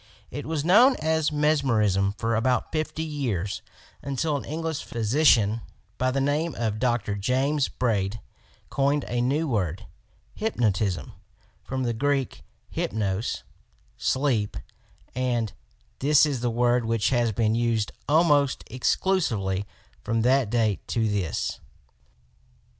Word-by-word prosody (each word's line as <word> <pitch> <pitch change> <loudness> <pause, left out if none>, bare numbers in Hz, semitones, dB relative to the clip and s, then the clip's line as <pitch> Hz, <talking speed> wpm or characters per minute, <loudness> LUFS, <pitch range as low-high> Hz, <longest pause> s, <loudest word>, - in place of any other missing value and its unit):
It 145 - -6
was 155 -2 -2
known 240 +9 +6
as 160 0 0
Mes 150 0 +2
merism 105 -5 +1
for 115 +1 0
about 125 +3 +1
fifty 155 0 -2
years, 120 - -2 0.4
until 140 +3 -1
an 140 - -4
English 160 0 -3
physician 115 -2 +3 0.4
by 130 - +2
the 135 +2 0
name 145 +3 0
of 110 -2 -2
Dr. 120 -5 0
James 130 +7 +1
Braid 110 -3 -1 0.5
coined 140 +1 +1
a 120 0 -1
new 145 +6 +1
word, 95 - -1 0.5
"Hypnotism," 105 - -1 0.5
from 130 0 -3
the 120 -1 0
Greek 135 +2 -1 0.3
"Hypnos" 105 0 -2 0.3
— - - -36 0.2
sleep, 130 -7 0 0.6
and 120 -4 -1 0.5
this 150 +2 +5
is 140 -4 -1
the 120 - +1
word 120 +1 +2
which 115 -1 0
has 120 -3 +2
been 110 +1 +1
used 115 -2 0 0.2
almost 145 -3 +3
exclusively 110 - 0 0.4
from 115 0 0
that 130 -2 +3
date 110 -5 0
to 115 -2 0
this. 100 -7 -2
125 Hz, 125 wpm, -26 LUFS, 110-145 Hz, 0.6 s, known